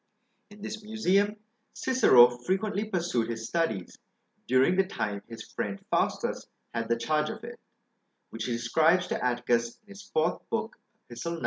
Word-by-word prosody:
In 205 0 -14
this 215 0 -6
museum, 210 -1 +1 0.4
Cicero 125 - +5
frequently 200 - -1
pursued 175 - -1
his 115 -1 -4
studies, 135 - -2 0.5
during 130 +8 +4
the 190 0 +2
time 105 - -3
his 115 -1 -8
friend 100 -1 -3
Faustus - - 0 0.3
had 115 -1 -2
the 115 - +2
charge 150 +5 0
of - - -7
it; - - -8 0.7
which 115 -1 -4
he 125 - -2
describes 160 +10 +3
to - - -2
Atticus 120 -1 0
in 205 - -28
his 200 +1 -13
4th 160 +3 +1
Book, 225 0 -2 0.3
Epist. 120 +6 -7
9. 170 0 -3
155 Hz, 155 wpm, -28 LUFS, -, 0.7 s, Cicero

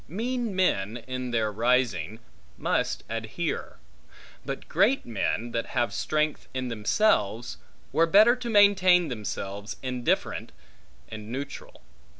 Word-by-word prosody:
Mean 230 - -2
men, 115 - +1
in 130 -1 -4
their 110 -3 0
rising, 115 -3 0 0.4
must - - -1
adhere; - - -4 0.7
but - - -6
great 270 +5 +2
men, 115 +1 -2
that 115 0 -2
have 120 -1 +1
strength 155 0 -1
in 130 -1 -2
themselves, 115 - +1 0.3
were 165 +1 +3
better 215 +7 +6
to 245 -1 -6
maintain 190 -5 +5
themselves 105 -2 -5
indifferent, 125 -2 -1 0.6
and 110 0 -8
neutral. 135 - -7
125 Hz, 115 wpm, -27 LUFS, 110-185 Hz, 0.7 s, better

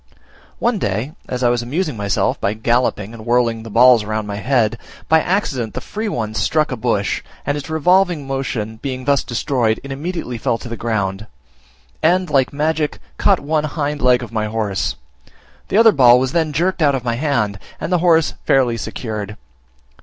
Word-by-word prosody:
One 235 -3 0
day, 110 - -2 0.2
as 125 0 -3
I 120 - +4
was 120 0 +1
amusing 150 +4 -2
myself 100 -2 -1
by 100 +2 0
galloping 115 -2 0
and 115 -1 -10
whirling 120 -1 +1
the 115 - -9
balls 120 +1 +6
round 110 0 -3
my 100 -1 -4
head, 120 -1 +1 0.3
by 160 0 +4
accident 140 - -1
the - - -2
free 215 +1 -4
one 110 - -3
struck 150 +9 +1
a - - -1
bush, 110 -4 -1 0.2
and 145 - 0
its 145 -1 -6
revolving 175 0 +2
motion 130 -5 -3
being 130 +1 -5
thus 140 -1 +2
destroyed, 120 -2 0
it 140 - -8
immediately 140 -4 -4
fell 115 - 0
to 120 - -9
the 115 - -5
ground, 105 -3 -2 0.7
and, 180 +1 +2
like 135 -3 +2
magic, 150 +1 -1 0.2
caught - - +3
one 155 +1 0
hind 150 -1 -3
leg 125 -1 +4
of 120 - -8
my 110 -1 -1
horse; 105 -3 -2 0.7
the - - 0
other 225 0 +7
ball 125 -6 +6
was 130 0 -1
then 160 -1 +1
jerked 175 +5 0
out 145 -3 +4
of 130 - -3
my 120 -1 -1
hand, 115 -7 -1 0.2
and 180 - -3
the 180 - +3
horse 165 -2 +3
fairly 125 -3 +3
secured. 105 -2 -5
125 Hz, 185 wpm, -19 LUFS, 110-150 Hz, 0.7 s, other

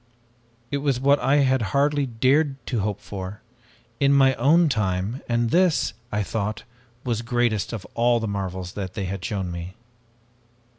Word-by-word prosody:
It 140 - 0
was 140 -3 0
what 140 +2 +4
I 140 +3 +3
had 130 -1 +2 0.2
hardly 145 0 +2
dared 135 +5 +2
to 120 - -1
hope 105 0 -2
for, 100 0 -7 0.6
in 140 -1 +4
my 135 -1 +5
own 160 +7 +4
time, 105 -1 -1
and 120 -1 +1
this, 180 - +3 0.2
I 105 0 0
thought, 105 +1 -3 0.4
was 115 -3 -1
greatest 120 -3 0
of 110 -5 -6
all 120 0 +3
the 110 - -3
marvels 95 -3 -4
they 95 0 -4
had 95 0 -5
shown 95 -4 -3
me! 85 +2 -7
115 Hz, 155 wpm, -24 LUFS, 100-135 Hz, 0.6 s, my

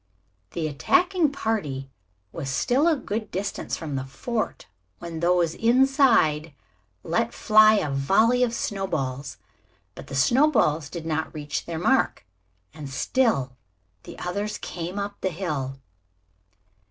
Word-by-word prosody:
The 160 -2 -2
attacking 325 - +2
party 155 - -2 0.4
was 140 -5 -5
still 250 - +2
a 330 - +4
good 220 -5 -4
distance 195 +2 -3
from 150 -4 -5
the 130 - -2
fort 215 - -4 0.3
when 170 -2 -7
those 170 -1 +2
inside 230 - +3 0.5
let - - -1
fly 215 0 +6
a 155 -9 0
volley 195 - +3
of 245 -2 +2
snowballs. 160 - -3 0.6
But - - -11
the 135 - -6
snowballs 165 - +3
did 170 -2 -7
not 160 0 -2
reach 145 -1 -4
their 165 -1 -4
mark, 220 - +1 0.5
and 145 -3 -8
still 135 - 0 0.5
the - - -11
others 205 +4 -3
came 175 +2 -6
up 200 0 -4
the 190 - 0
hill. 150 -7 -3
175 Hz, 130 wpm, -25 LUFS, 150-225 Hz, 0.6 s, fly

